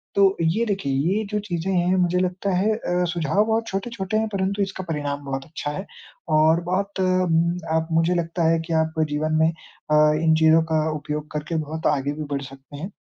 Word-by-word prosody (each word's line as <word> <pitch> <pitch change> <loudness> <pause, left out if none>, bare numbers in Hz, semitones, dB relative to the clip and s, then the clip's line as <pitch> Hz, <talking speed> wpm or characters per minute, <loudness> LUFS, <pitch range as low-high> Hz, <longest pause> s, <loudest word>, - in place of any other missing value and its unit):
तो 195 -1 +5
ये 165 +8 +1
देखिए 195 -10 -1 0.2
ये 220 - -1
जो 210 - 0
चीज़ें 190 -2 -3
हैं 180 +1 +2
मुझे 180 0 +2
लगता 185 +2 -1
है 205 +4 +2
अ, 180 -5 -1
सुझाव 170 +5 +1
बहुत 225 +1 0
छोटे-छोटे 195 0 -3
हैं 220 0 +1
परंतु 195 +1 -1
इसका 190 -1 -5
परिणाम 145 -2 -3
बहुत 135 0 -4
अच्छा 150 -2 -5
है 190 +6 -5 0.5
और 160 +2 +4
बहुत 195 +3 -2
उम, 175 -2 +2 0.2
आप 160 0 0
मुझे 165 +2 +3
लगता 170 0 -1
है 165 - +3
कि 165 - -2
आप 160 0 -5 0.2
जीवन 155 +1 -1
में 160 - +5
अ, 155 -1 -5 0.3
इन 160 -1 +4
चीज़ों 160 0 +6
का 155 0 +2
उपयोग 150 0 -5
करके 150 +2 -4
बहुत 160 +2 -3
आगे 140 +1 -2
भी 155 +1 -5
बढ़ 140 - -1
सकते 135 +2 -11
हैं 180 +8 -6
170 Hz, 200 wpm, -23 LUFS, 155-190 Hz, 0.5 s, चीज़ों